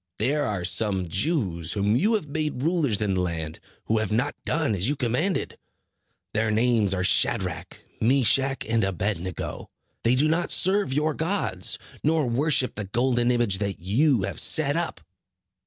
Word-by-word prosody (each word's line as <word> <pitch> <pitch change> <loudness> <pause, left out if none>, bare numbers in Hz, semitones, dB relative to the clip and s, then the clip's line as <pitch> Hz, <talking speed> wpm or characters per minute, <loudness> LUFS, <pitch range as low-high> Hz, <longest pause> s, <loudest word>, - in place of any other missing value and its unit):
There 145 +7 +1
are 100 -6 -2
some 95 0 0
Jews, 95 - 0
whom 105 +1 +1
you 210 - +2
have 200 -8 -2
made 150 -3 -3
rulers 155 - +1
in 100 -2 0
the 90 - 0
land, 80 -3 -4 0.3
who 110 0 +1
have 110 -1 -2
not 125 +7 0
done 155 -8 +1
as 100 +4 0
you 145 - 0
commanded. 135 - -1 0.7
Their 110 +1 +1
names 110 -2 +2
are 90 - -1
Shadrach, - - 0 0.2
Meshach 135 +2 +2
and 115 +1 +1
Abed 95 0 -1
nego. 90 -1 -6 0.3
They 120 +2 +3
do 145 +4 +3
not 165 +2 0
serve 195 -3 +1
your 150 +3 +1
gods, 145 - -1 0.3
nor 155 -1 +2
worship 130 +2 +1
the 105 - -5
golden 120 +4 +1
image 120 -6 +1
that 100 -2 -3
you 115 - +2
have - - -2
set 150 -3 +2
up." 165 - -3
120 Hz, 165 wpm, -25 LUFS, 100-150 Hz, 0.7 s, They